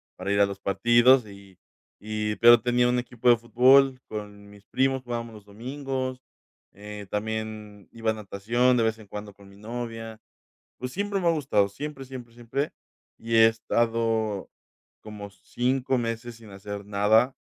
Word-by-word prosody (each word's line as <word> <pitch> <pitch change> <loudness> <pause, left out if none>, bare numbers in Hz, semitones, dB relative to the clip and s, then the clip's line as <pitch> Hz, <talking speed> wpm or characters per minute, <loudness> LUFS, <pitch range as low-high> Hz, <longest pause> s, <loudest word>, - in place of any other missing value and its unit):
para 95 +2 -4
ir 100 - +2
a 100 - +6
los 100 0 -6
partidos. 120 +6 +4
Y 100 -2 -14 0.4
y 105 0 -3
pero, 120 -1 +7
tenía 125 0 +2
un 125 0 +2
equipo 120 0 0
de 120 - +7
fútbol 130 +3 +4
con 105 -1 -8
mis 100 -1 -17
primos, 135 0 0
jugábamos 115 -2 -5
los 105 -1 -13
domingos, 130 +3 -5 0.5
eh, 105 0 -9
también 110 -1 -5
iba 115 -1 -1
a - - -2
natación 115 +5 +1
de 115 - +2
vez 110 0 0
en 105 - -14
cuando 105 0 -8
con 100 0 -18
mi 100 - -17
novia. 115 0 -6 0.6
Pues, 125 0 -5
siempre 200 0 -2
me 175 - -2
ha - - +5
gustado, 135 -10 +1
siempre, 135 +5 -7
siempre, 125 -3 -10
siempre, 120 +5 -3 0.5
y 115 0 -1
he 110 0 +8
estado 115 -2 0 0.5
como 105 -1 -9
5 130 +4 -1
meses 115 0 -4
sin 110 -3 -14
hacer 100 +1 -7
nada 110 +5 +3
115 Hz, 165 wpm, -26 LUFS, 105-125 Hz, 0.6 s, he